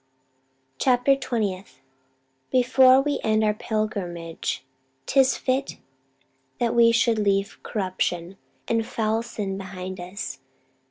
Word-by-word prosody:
Chapter 255 +1 +4
Twentieth. 205 - -3 0.7
"Before 255 +1 +5
We 290 0 -1
end 220 0 +2
our 210 -1 +3
pilgrimage, 190 - -3 0.4
'tis 270 -1 +3
fit 265 +1 -1 0.8
that 235 -1 +1
we 235 -1 +6
Should 230 -1 +2
leave 200 -1 0
corruption, 185 -2 -2 0.3
and 230 -1 +1
foul 220 -1 -1
sin 200 -4 -4
behind 185 -1 -7
us. 180 +4 -6
215 Hz, 105 wpm, -24 LUFS, 190-245 Hz, 0.8 s, we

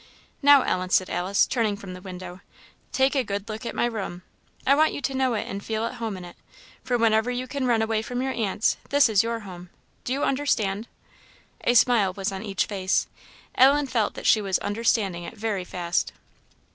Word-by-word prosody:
"Now, 285 -2 +7
Ellen," 185 0 -1
said 185 0 +2
Alice, 190 +3 +2
turning 220 -5 0
from 195 -2 -9
the 180 - -9
window, 185 -1 -9 0.5
"take 265 +1 +2
a 270 -3 +1
good 200 -1 -4
look 220 +1 -6
at - - -5
my - - +1
room. 195 -6 -4 0.4
I 275 - +5
want 310 +2 +3
you - - -5
to 270 - -2
know 260 -2 +1
it 210 - -2
and 200 +1 -5
feel 220 0 -2
at - - -4
home 220 -4 -3
in 180 - -8
it; 175 - -12 0.5
for 245 - 0
whenever 225 0 +3
you 250 +1 -2
can 260 0 -3
run 230 -2 +3
away 220 -1 0
from 245 +2 -4
your 265 +1 -1
aunt's, 215 -1 0
this 285 -2 +5
is 210 -3 +4
your 230 0 -3
home 180 -3 -10 0.3
do - - -4
you 275 +2 0
understand?" 225 -7 0 0.8
A 240 - +3
smile 225 -6 +4
was 195 0 -3
on 190 -1 -5
each 200 -4 -1
face. 190 -2 0 0.5
Ellen 280 +3 +5
felt 235 -5 -1
that - - -8
she 215 - +5
was 195 -2 0
understanding 205 -4 0
it 170 - -9
very 210 -3 -2
fast. 175 -1 -2
220 Hz, 210 wpm, -25 LUFS, 195-245 Hz, 0.8 s, Now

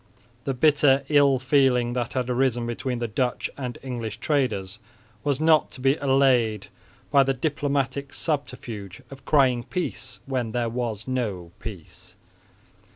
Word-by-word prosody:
The 135 - -1
bitter 140 -1 +4
ill 140 -3 +5
feeling 125 -2 +2
that 120 -1 -2
had 125 -2 -1
arisen 125 -1 +1
between 120 +2 -3
the 120 0 -2
Dutch 125 +3 -1
and 125 -3 -5
English 120 -4 -4
traders 110 -9 -1 0.4
was 145 -2 0
not 155 -1 +4
to - - -10
be 135 +2 +3
allayed 125 -7 +2 0.4
by 140 -2 +6
the 135 0 +1
diplomatic 140 -1 -1
subterfuge 125 - -4
of 135 -1 -12
crying 130 -5 +3
peace 150 -7 -4
when 125 -5 -2
there 120 -1 0
was 115 -2 -3
no 105 -10 -3
peace. 100 -8 -9
130 Hz, 140 wpm, -25 LUFS, 120-140 Hz, 0.4 s, by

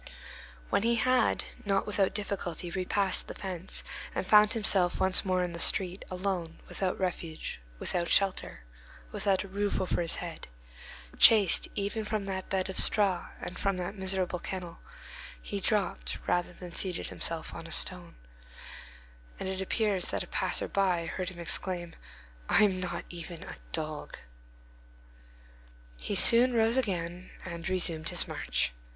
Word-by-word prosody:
When - - +3
he 235 +2 +2
had, 255 +3 +2 0.2
not 195 -1 +1
without 200 -2 +1
difficulty, 180 -4 -3
repassed 190 +1 0
the - - -7
fence, 185 -2 -4 0.3
and - - -1
found 210 0 +6
himself 195 -5 +2
once 190 0 +4
more 185 -2 +1
in 175 -1 -3
the 170 - -6
street, 185 +2 +3
alone, 180 -3 -3
without 185 -2 -2
refuge, 170 - -4 0.2
without 170 - -1
shelter, 195 - +1 0.5
without 195 - +1
a - - -9
roof 200 +1 -1
over 185 -2 0
his 165 - +1
head, 170 -2 -7 0.7
chased 210 -6 +7
even 205 +2 -2
from 210 -1 -2
that 190 -1 -4
bed 190 -1 0
of 190 - -1
straw 195 -5 +3
and 180 - -6
from 195 -2 0
that 180 +2 -4
miserable 190 -2 -1
kennel, 175 -2 -6 0.6
he - - -5
dropped - - 0
rather 175 0 0
than 175 0 -10
seated 180 -1 -2
himself 165 -1 -2
on 165 - -8
a - - -11
stone, 180 0 +1 1.2
and - - -4
it 190 0 -3
appears 195 -2 0
that - - -1
a - - -11
passer - - 0
by 185 -4 +1
heard 180 +2 -4
him 185 - -11
exclaim, 175 0 -3 0.6
"I - - +5
am 190 -3 +2
not 180 -1 -4
even 170 -1 -8
a - - -9
dog!" 155 -1 -2 1.8
He - - -2
soon 245 +2 +7
rose 225 +1 +3
again 180 -6 -2 0.2
and 170 0 -5
resumed 170 -4 0
his - - +1
march. - - -1
185 Hz, 150 wpm, -30 LUFS, 175-195 Hz, 1.8 s, chased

